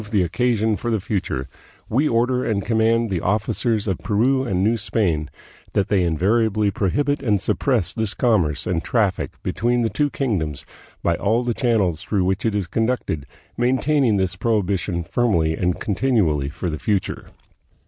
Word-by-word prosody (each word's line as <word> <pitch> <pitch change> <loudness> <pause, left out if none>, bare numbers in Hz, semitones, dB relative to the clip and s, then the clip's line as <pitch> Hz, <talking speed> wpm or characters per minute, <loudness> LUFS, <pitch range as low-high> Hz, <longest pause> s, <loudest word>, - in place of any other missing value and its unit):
223 105 -1 -1
the - - +2
occasion 110 +4 +1
for 120 - -4
the 110 -2 +1
future, 90 -9 -3 0.4
we 140 +7 +1
order 125 +2 +1
and 100 -3 -1
command 115 0 +2
the 90 -3 -1
officers 110 +2 0
of 95 -4 -1
Peru 130 +6 +1
and 95 -7 0
New 110 +3 +3
Spain 95 -7 0 0.4
that 100 - +1
they 100 -2 +3
invariably 105 +5 +1
pro 95 0 0
hibit 145 +5 0
and 105 -4 +1
suppress 105 - 0
this 110 -2 -1
commerce 90 - +1
and 85 -2 -1
traffic 105 -6 0
between 120 +3 0
the 115 - 0
two 145 -1 +1
kingdoms 95 - -2 0.4
by 85 - +2
all 115 +4 +1
the 120 -1 0
channels 105 - +1
through 100 -4 0
which 95 +4 0
it 110 - -1
is 100 -3 0
conducted, 110 - -2 0.3
maintaining 130 -1 +2
this 95 -2 0
prohibition 95 -5 0
firmly 85 -5 +1
and 90 +2 -1
con 105 - -2
tinually 90 - +1
for 85 +2 -4
the 75 - -5
future." 100 -4 -2
105 Hz, 170 wpm, -22 LUFS, 90-115 Hz, 0.4 s, New